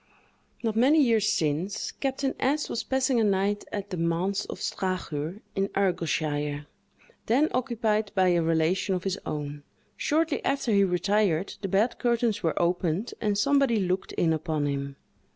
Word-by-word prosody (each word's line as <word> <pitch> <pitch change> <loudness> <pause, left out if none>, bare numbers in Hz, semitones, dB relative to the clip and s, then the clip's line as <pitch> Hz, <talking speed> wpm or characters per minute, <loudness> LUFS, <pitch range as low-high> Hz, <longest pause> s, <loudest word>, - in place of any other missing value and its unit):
Not 220 -2 0
many 270 +7 +5
years 225 -6 +3
since, 180 +2 -1
Captain 270 0 -2
S—— 290 +3 0
was 230 - -2
passing 265 -2 +1
a - - +3
night 200 0 +1
at 205 -1 -5
the 180 - -3
Manse 170 +4 0
of - - -7
Strachur, 180 -1 -3
in 195 0 +1
Argyleshire, 150 -6 0 0.6
then 270 +8 +3
occupied 225 -4 0
by 185 -1 +4
a 175 -1 +3
relation 165 +4 +1
of 180 - -4
his 195 0 -2
own; 145 -1 -4 0.3
shortly 315 0 0
after 275 -4 0
he 200 -1 +5
retired, 190 -1 +1
the 195 - -2
bed 200 +6 +1
curtains 235 -3 +1
were 165 -3 0
opened, 175 +4 0
and 210 -2 +1
somebody 275 0 +3
looked 185 -1 -1
in 165 -2 +2
upon 155 -2 -1
him. 140 -1 -3
195 Hz, 155 wpm, -27 LUFS, 170-230 Hz, 0.6 s, many